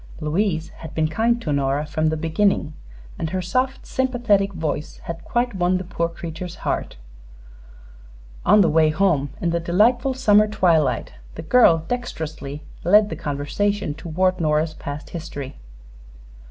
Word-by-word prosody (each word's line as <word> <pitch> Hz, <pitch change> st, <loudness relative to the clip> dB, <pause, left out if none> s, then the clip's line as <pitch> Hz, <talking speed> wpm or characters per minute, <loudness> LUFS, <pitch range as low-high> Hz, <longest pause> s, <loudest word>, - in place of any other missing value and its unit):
Louise 165 Hz, +1 st, -1 dB
had 160 Hz, -2 st, -10 dB
been 155 Hz, -1 st, +2 dB
kind 230 Hz, +9 st, +1 dB
to 155 Hz, -10 st, -2 dB
Nora 140 Hz, +1 st, 0 dB
from 155 Hz, +1 st, -1 dB
the 160 Hz, -, -1 dB
beginning, 165 Hz, 0 st, +1 dB, 0.5 s
and 160 Hz, -, -2 dB
her 185 Hz, -, -2 dB
soft, 255 Hz, +9 st, -1 dB
sympathetic 240 Hz, -7 st, +1 dB
voice 155 Hz, -4 st, -4 dB
had 170 Hz, 0 st, -6 dB
quite 240 Hz, 0 st, -1 dB
won 180 Hz, -1 st, +1 dB
the 185 Hz, -, -4 dB
poor 170 Hz, -2 st, -2 dB
creature's 170 Hz, +1 st, -7 dB
heart. -, -, -2 dB, 1.5 s
On 210 Hz, +3 st, +6 dB
the 180 Hz, -, +4 dB
way 155 Hz, 0 st, +4 dB
home, 155 Hz, -4 st, +1 dB
in 170 Hz, -, +1 dB
the 170 Hz, -, 0 dB
delightful 235 Hz, +10 st, +2 dB
summer 215 Hz, -5 st, +4 dB
twilight, 165 Hz, -, +1 dB, 0.2 s
the -, -, -7 dB
girl 165 Hz, -6 st, +5 dB
dexterously 155 Hz, -, -5 dB, 0.2 s
led 210 Hz, +4 st, +5 dB
the -, -, -2 dB
conversation 155 Hz, +6 st, -2 dB
toward 180 Hz, +4 st, -1 dB
Nora's 155 Hz, 0 st, +1 dB
past 145 Hz, 0 st, -7 dB
history. 150 Hz, -5 st, -7 dB
170 Hz, 145 wpm, -22 LUFS, 155-205 Hz, 1.5 s, On